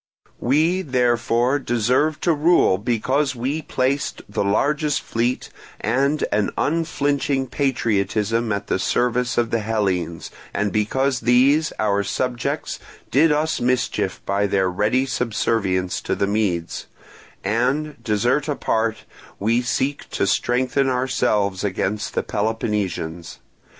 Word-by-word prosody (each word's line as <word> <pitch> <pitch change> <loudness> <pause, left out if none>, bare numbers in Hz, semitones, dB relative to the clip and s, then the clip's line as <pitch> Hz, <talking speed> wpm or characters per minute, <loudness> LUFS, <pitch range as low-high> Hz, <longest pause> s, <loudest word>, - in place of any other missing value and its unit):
"We, 160 +8 +2
therefore, 125 -1 +1
deserve 130 +5 +1
to 170 - +3
rule 155 - +3
because 130 +5 0
we 135 +6 -2
placed 135 0 -1
the 100 - -1
largest 145 +9 +1
fleet 120 +2 -1 0.3
and 140 +7 +1
an 105 -1 +1
unflinching 145 -4 0
patriotism 115 -4 0
at 100 0 -2
the - - -1
service 125 +4 0
of 120 -1 +1
the 115 - +1
Hellenes, 95 -7 -2 0.2
and 100 0 0
because 130 +5 +1
these, 135 +6 +3
our 100 -1 +1
subjects, 125 +3 -2 0.3
did 150 +4 +4
us 150 +1 0
mischief 125 +1 0
by 100 +1 +1
their 95 -2 +1
ready 110 +8 +1
subservience 110 -7 -1
to - - -1
the 100 - +1
Medes; 100 -5 -1 0.6
and, 130 +9 -1
desert 120 +6 +1
apart, 115 -6 -1 0.3
we 115 +4 +1
seek 135 +3 -2
to - - 0
strengthen 130 +2 +1
ourselves 110 -7 0
against 100 +1 -2
the - - +1
Peloponnesians. 100 -6 -2
120 Hz, 120 wpm, -22 LUFS, 105-135 Hz, 0.6 s, did